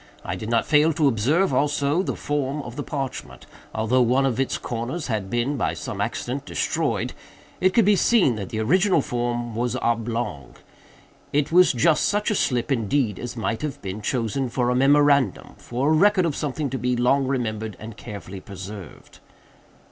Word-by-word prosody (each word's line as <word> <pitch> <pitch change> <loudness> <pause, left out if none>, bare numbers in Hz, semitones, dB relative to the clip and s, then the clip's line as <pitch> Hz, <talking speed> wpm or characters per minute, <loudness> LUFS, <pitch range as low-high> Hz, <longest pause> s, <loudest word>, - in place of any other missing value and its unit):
I 85 - -3
did 110 +4 -6
not 115 0 +2
fail 155 +1 +4
to 150 -1 +2
observe, 140 - +2
also, 145 +4 +1
the - - -3
form 145 0 -2
of 120 -2 -8
the 145 - -3
parchment. 135 -3 -5 0.3
Although 115 +4 +1
one 125 +3 +3
of 130 -2 0
its 135 - 0
corners 125 +7 -4
had 105 -4 -2
been, 120 +5 -1
by - - -1
some - - -5
accident, - - -3
destroyed, - - -1 0.5
it 185 0 +2
could 230 - +5
be 205 0 +5
seen 190 - +3
that 100 -3 -5
the 110 - -3
original 180 - +3
form 120 -1 -2
was 120 +2 -1
oblong. 115 - -2 0.8
It 145 +1 0
was 180 +2 +6
just 150 +5 +3
such 210 +2 +1
a - - +1
slip, 125 -5 0
indeed, 115 -3 0
as 125 0 -6
might 110 0 -2
have 145 -2 -4
been 100 +2 -5
chosen 120 +3 -1
for 125 0 0
a - - +1
memorandum—for 140 -1 +2
a - - +4
record 195 +2 +4
of 155 -4 -1
something 145 -1 -3
to 130 - -3
be 125 0 0
long 130 +3 +2
remembered 110 -5 -2
and 110 0 -8
carefully 100 -3 -8
preserved." 95 -2 -10
125 Hz, 180 wpm, -23 LUFS, 115-145 Hz, 0.8 s, was